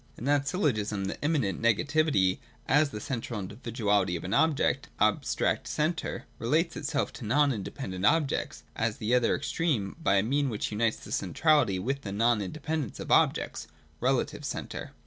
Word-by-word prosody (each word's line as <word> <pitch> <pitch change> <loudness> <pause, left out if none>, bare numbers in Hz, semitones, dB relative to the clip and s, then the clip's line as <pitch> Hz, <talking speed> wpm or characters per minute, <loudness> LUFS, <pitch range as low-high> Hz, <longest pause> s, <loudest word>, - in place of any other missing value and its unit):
In - - -8
that 140 0 +2
syllogism 110 - 0
the 95 - -5
immanent 145 - 0
negativity, 115 -4 +2 0.3
as 145 +3 +4
the 105 - -6
central 115 -1 -4
individuality 105 -2 -1
of 85 - -5
an 95 - -3
object, 155 0 +2
(abstract - - +1
centre,) 155 +2 -2
relates 160 +8 +1
itself 145 -2 -2
to - - -9
non 140 +5 +3
independent 95 -3 -5
objects, 150 +5 +1
as 115 -1 -1
the 110 +3 -1
other 125 -2 +3
extreme, 140 - -1
by 100 - +3
a 95 - +3
mean 140 +4 +1
which 110 -2 -3
unites 110 +1 +1
the - - -11
centrality 115 - +2
with 135 +9 -2
the 100 - -6
non 115 +2 +2
independence 150 +4 -4
of - - -6
the - - +4
objects, - - +2 0.3
(relative - - 0
centre.) - - -5
120 Hz, 165 wpm, -29 LUFS, 105-145 Hz, 0.3 s, as